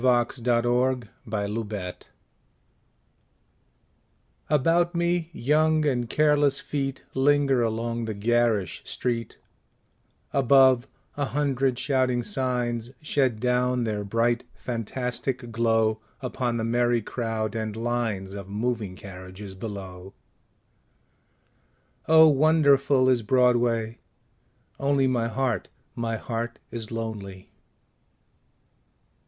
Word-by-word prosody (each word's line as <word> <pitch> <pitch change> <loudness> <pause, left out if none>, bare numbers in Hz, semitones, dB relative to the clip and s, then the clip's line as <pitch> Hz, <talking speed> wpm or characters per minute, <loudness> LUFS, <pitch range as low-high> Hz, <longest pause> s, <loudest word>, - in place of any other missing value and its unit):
Claude 125 -2 +3
McKay 120 +1 +1
On 120 -4 -12 0.6
Broadway 95 -4 -4 2.6
ABOUT 165 +4 +2
me 170 -1 0
young 155 +2 +2
and 120 -5 0
careless 145 -2 +3
feet 135 -2 -3
Linger 135 -1 +3
along 115 +1 -1
the 110 -1 -4
garish 110 -3 +1
street; 120 -2 -3 1.0
Above, 130 -1 +5 0.3
a 145 - 0
hundred 135 -2 0
shouting 130 -2 +1
signs 125 - -1
Shed 130 -6 +1
down 125 +1 +1
their 105 -2 -2
bright 115 +3 +1
fantastic 125 +1 -3
glow 110 -1 +2 0.2
Upon 125 -2 -2
the 115 - -2
merry 120 0 +1
crowd 110 -2 -3
and 110 -1 -3
lines 115 -5 -2
Of 100 -1 -8
moving 105 -2 -2
carriages 95 +1 -9
below. 95 -2 -8 1.9
Oh 160 0 +8
wonderful 140 -3 +4
is 125 -2 +3
Broadway 120 -1 +2 0.8
only 140 -1 +2
My 120 -3 +1
heart, 115 -3 -1 0.3
my 115 -1 -2
heart 115 +1 -4
is 115 -2 -6
lonely. 105 -5 -6
120 Hz, 95 wpm, -26 LUFS, 110-135 Hz, 2.6 s, Oh